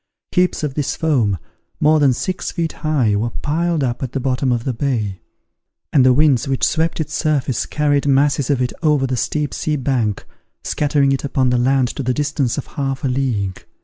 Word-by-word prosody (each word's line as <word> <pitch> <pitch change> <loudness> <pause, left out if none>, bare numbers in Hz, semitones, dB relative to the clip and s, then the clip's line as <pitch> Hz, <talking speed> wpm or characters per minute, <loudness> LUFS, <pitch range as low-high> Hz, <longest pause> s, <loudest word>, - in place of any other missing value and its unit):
Heaps 180 -3 +1
of 145 -3 -1
this 145 -1 -2
foam, 125 - +1 0.4
more 155 +1 +4
than 140 -3 +4
six 180 +9 -3
feet 165 -2 -2
high, 140 -10 +1
were 110 +4 0
piled 160 +4 -1
up 120 -2 -2
at 130 -3 -4
the 135 - -1
bottom 130 0 0
of 120 -1 0
the 130 - -2
bay; 110 -7 -2 0.7
and 140 - +5
the 130 - +6
winds 140 0 +3
which 135 -1 -1
swept 165 0 0
its 155 -1 -3
surface 145 -4 0
carried 145 -1 +1
masses 140 -1 +2
of 135 -3 +2
it 125 - -2
over 150 -4 +2
the 130 -1 -1
steep 145 +3 -1
sea 155 - -1
bank, 125 -7 -1 0.4
scattering 145 -2 +1
it 135 - -1
upon 130 -2 +1
the 125 - +2
land 130 0 +2
to - - -5
the 125 -1 -1
distance 145 -4 -1
of 145 - -3
half 135 -2 -4
a - - +1
league. 120 -8 -1
135 Hz, 200 wpm, -19 LUFS, 125-150 Hz, 0.7 s, the